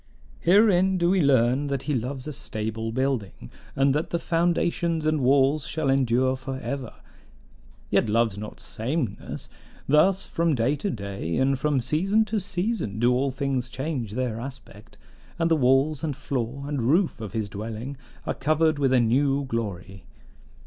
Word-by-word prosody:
Herein 190 Hz, 0 st, +4 dB
do 170 Hz, 0 st, +2 dB
we 190 Hz, -1 st, +3 dB
learn 130 Hz, 0 st, +3 dB
that 140 Hz, -2 st, -2 dB
he 150 Hz, -, -1 dB
loves 130 Hz, +1 st, -3 dB
a 150 Hz, -, -5 dB
stable 110 Hz, -1 st, -4 dB
building, 125 Hz, -, -2 dB, 0.2 s
and 135 Hz, 0 st, +3 dB
that 150 Hz, +3 st, -1 dB
the 170 Hz, -, 0 dB
foundations 170 Hz, -1 st, 0 dB
and 155 Hz, -2 st, +1 dB
walls 135 Hz, +2 st, +3 dB
shall 155 Hz, -4 st, 0 dB
endure 130 Hz, -1 st, +2 dB
for 130 Hz, 0 st, -6 dB
ever: 135 Hz, -2 st, -5 dB, 1.0 s
yet -, -, +2 dB
loves 115 Hz, -1 st, +2 dB
not 105 Hz, +1 st, -8 dB
sameness; 125 Hz, -1 st, -4 dB, 0.4 s
thus, 180 Hz, +7 st, +4 dB
from 165 Hz, -2 st, 0 dB
day 125 Hz, +4 st, +1 dB
to 150 Hz, +8 st, -3 dB
day 100 Hz, -, -4 dB
and 135 Hz, 0 st, +2 dB
from 145 Hz, -1 st, +1 dB
season 190 Hz, -, +2 dB
to 215 Hz, 0 st, -1 dB
season 190 Hz, -, -2 dB
do 120 Hz, +2 st, +3 dB
all 135 Hz, +2 st, +1 dB
things 135 Hz, -2 st, -2 dB
change 130 Hz, -6 st, -4 dB
their 120 Hz, -2 st, -2 dB
aspect, 120 Hz, -4 st, -10 dB, 0.4 s
and 165 Hz, 0 st, +1 dB
the -, -, +6 dB
walls 135 Hz, +2 st, +2 dB
and 150 Hz, -4 st, -1 dB
floor 130 Hz, +1 st, -3 dB
and 145 Hz, -3 st, -2 dB
roof 160 Hz, -, +2 dB
of 110 Hz, -2 st, -6 dB
his 110 Hz, -3 st, -1 dB
dwelling 110 Hz, +6 st, -6 dB, 0.3 s
are -, -, -1 dB
covered 155 Hz, +1 st, +1 dB
with 135 Hz, -2 st, +2 dB
a 130 Hz, -, +5 dB
new 135 Hz, +4 st, +2 dB
glory. 100 Hz, -6 st, -5 dB
135 Hz, 165 wpm, -25 LUFS, 115-155 Hz, 1.0 s, the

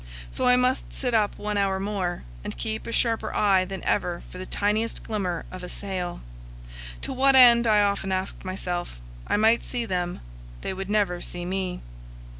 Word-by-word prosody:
So -, -, 0 dB
I 250 Hz, -, +7 dB
must 250 Hz, +1 st, +1 dB
sit 250 Hz, -3 st, -1 dB
up 215 Hz, -2 st, +2 dB
one 210 Hz, 0 st, -2 dB
hour 195 Hz, -1 st, +1 dB
more, 190 Hz, -3 st, -2 dB, 0.2 s
and -, -, -6 dB
keep 110 Hz, -, -3 dB
a -, -, -4 dB
sharper 230 Hz, -1 st, +1 dB
eye 195 Hz, -3 st, +4 dB
than 190 Hz, -1 st, -6 dB
ever 175 Hz, -1 st, 0 dB
for 180 Hz, -, -8 dB
the 185 Hz, -, -6 dB
tiniest 215 Hz, +3 st, 0 dB
glimmer 185 Hz, -6 st, -2 dB
of 185 Hz, -, -7 dB
a 180 Hz, -, -7 dB
sail. 185 Hz, -3 st, -4 dB, 0.8 s
To -, -, -3 dB
what 270 Hz, +1 st, +4 dB
end, 240 Hz, -2 st, +8 dB
I 210 Hz, -1 st, +5 dB
often 200 Hz, -1 st, 0 dB
asked 190 Hz, 0 st, -2 dB
myself? 180 Hz, -, -4 dB, 0.3 s
I -, -, +2 dB
might 225 Hz, +2 st, +4 dB
see 245 Hz, -2 st, -3 dB
them; 180 Hz, -4 st, -2 dB, 0.4 s
they -, -, -3 dB
would 195 Hz, +1 st, -5 dB
never 200 Hz, -4 st, +1 dB
see 175 Hz, 0 st, -5 dB
me. 185 Hz, 0 st, -2 dB
195 Hz, 185 wpm, -26 LUFS, 180-220 Hz, 0.8 s, end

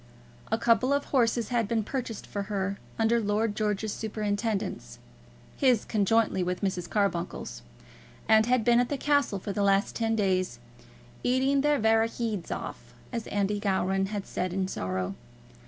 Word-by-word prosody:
A 225 Hz, -, +3 dB
couple 230 Hz, +3 st, +3 dB
of 285 Hz, 0 st, 0 dB
horses 235 Hz, -4 st, +1 dB
had 235 Hz, -4 st, +1 dB
been 225 Hz, 0 st, 0 dB
purchased 240 Hz, -2 st, -4 dB
for 200 Hz, -, -4 dB
her, 200 Hz, -1 st, -2 dB, 0.2 s
under 230 Hz, +1 st, +3 dB
Lord 210 Hz, 0 st, 0 dB
George's 210 Hz, 0 st, -1 dB
superintendence, 210 Hz, -, -3 dB, 0.6 s
his 250 Hz, -5 st, +3 dB
conjointly 215 Hz, -1 st, +2 dB
with 180 Hz, 0 st, -2 dB
Mrs. 180 Hz, -3 st, -1 dB
Carbuncle's, 180 Hz, -, -1 dB, 0.7 s
and 220 Hz, 0 st, +5 dB
had 250 Hz, -3 st, +2 dB
been 240 Hz, 0 st, +5 dB
at 245 Hz, -, +1 dB
the 285 Hz, -, -1 dB
castle 285 Hz, -7 st, +2 dB
for 200 Hz, +1 st, -5 dB
the 205 Hz, -, -1 dB
last 195 Hz, 0 st, +2 dB
ten 225 Hz, -1 st, 0 dB
days 190 Hz, -3 st, 0 dB, 0.7 s
"eating 265 Hz, +2 st, +2 dB
their 295 Hz, +1 st, +3 dB
varra 225 Hz, 0 st, +3 dB
heeds 225 Hz, -6 st, -3 dB
off," -, -, -6 dB, 0.2 s
as 230 Hz, -2 st, -3 dB
Andy 205 Hz, 0 st, 0 dB
Gowran 195 Hz, -1 st, +1 dB
had 205 Hz, -1 st, -4 dB
said 180 Hz, -1 st, -3 dB
in 190 Hz, 0 st, 0 dB
sorrow. 95 Hz, -, -3 dB
215 Hz, 155 wpm, -28 LUFS, 195-230 Hz, 0.7 s, and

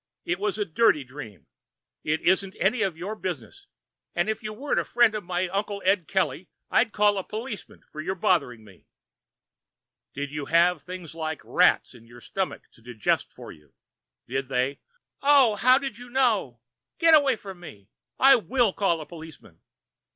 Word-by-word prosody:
It 175 Hz, +1 st, -1 dB
was 205 Hz, 0 st, -1 dB
a 210 Hz, -, -1 dB
dirty 160 Hz, -4 st, +3 dB
dream. 125 Hz, -, -11 dB, 0.6 s
It 155 Hz, +1 st, -1 dB
isn't 190 Hz, +1 st, +2 dB
any 215 Hz, +5 st, +1 dB
of 190 Hz, -6 st, -1 dB
your 185 Hz, +5 st, -5 dB
business. 215 Hz, -, -6 dB, 0.5 s
If 220 Hz, 0 st, -1 dB
you 215 Hz, -1 st, -5 dB
weren't 270 Hz, +7 st, -1 dB
a -, -, 0 dB
friend 240 Hz, -2 st, +3 dB
of 215 Hz, -, -4 dB
my 180 Hz, +1 st, -1 dB
Uncle 200 Hz, +2 st, -2 dB
Ed 190 Hz, -3 st, +2 dB
Kelly, 190 Hz, -2 st, -1 dB, 0.2 s
I'd 225 Hz, -2 st, +3 dB
call 205 Hz, -1 st, +2 dB
a -, -, -4 dB
policeman 220 Hz, +1 st, -7 dB
for 155 Hz, -, -6 dB
your 190 Hz, +5 st, -3 dB
bothering 145 Hz, -11 st, 0 dB
me." 95 Hz, -3 st, -19 dB, 1.3 s
"Did 140 Hz, 0 st, -4 dB
you 150 Hz, -1 st, -4 dB
have 170 Hz, +1 st, +3 dB
things 180 Hz, -3 st, -8 dB
like 160 Hz, -1 st, -5 dB
live -, -, -15 dB
rats -, -, +3 dB
in 115 Hz, -1 st, -16 dB
your 120 Hz, +1 st, -14 dB
stomach 190 Hz, +6 st, -4 dB
to -, -, -22 dB
digest 115 Hz, -2 st, -1 dB
for -, -, -11 dB
you? 75 Hz, -3 st, -19 dB, 0.5 s
Did 135 Hz, +2 st, -3 dB
they 130 Hz, +2 st, -1 dB, 0.2 s
" -, -, -62 dB
"Oh! 275 Hz, -6 st, +5 dB
How 255 Hz, +5 st, +5 dB
did 270 Hz, -5 st, -5 dB
you 245 Hz, 0 st, -11 dB
know? 225 Hz, -, +1 dB, 0.4 s
Get 330 Hz, -1 st, +6 dB
away 280 Hz, -4 st, +4 dB
from 195 Hz, -4 st, -10 dB
me. 105 Hz, -, -12 dB, 0.3 s
I 270 Hz, 0 st, +7 dB
will 235 Hz, -2 st, +1 dB
call 175 Hz, -5 st, 0 dB
a -, -, -7 dB
policeman. 160 Hz, -, -13 dB
185 Hz, 180 wpm, -26 LUFS, 150-220 Hz, 1.3 s, I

